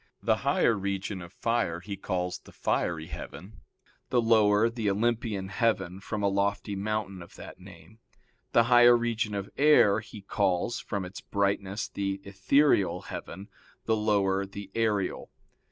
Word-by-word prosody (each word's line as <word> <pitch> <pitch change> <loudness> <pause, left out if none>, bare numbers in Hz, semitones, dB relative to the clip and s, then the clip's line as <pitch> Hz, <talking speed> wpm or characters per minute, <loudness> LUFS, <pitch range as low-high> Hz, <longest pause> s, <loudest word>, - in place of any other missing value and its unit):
The - - +2
higher 115 - +2
region 100 -1 -3
of 85 -1 -10
fire 115 -8 -1
he 100 +3 -6
calls 90 -2 -3
the - - -17
fiery 80 -3 -1
heaven; 95 +3 -9 0.5
the 125 - +2
lower, 110 -2 +4
the 115 -3 -2
Olympian 110 -2 -1
heaven 95 -4 0
from 105 +1 -4
a - - +3
lofty 100 +1 -1
mountain 100 -1 -3
of 85 - -13
that - - -11
name: 90 +2 -15 0.5
the 115 - +5
higher 120 0 +6
region 115 -3 -1
of 100 -1 -5
air 140 -8 +5
he 110 -2 -11
calls, 100 +2 0
from 100 -3 -4
its 90 +1 -9
brightness, 100 0 -1
the 100 -1 -3
ethereal 100 +3 +2
heaven; 100 +1 -7 0.4
the 110 - +2
lower, 100 -3 +1
the 100 0 -9
aerial. 105 -4 -1
100 Hz, 150 wpm, -28 LUFS, 95-110 Hz, 0.5 s, higher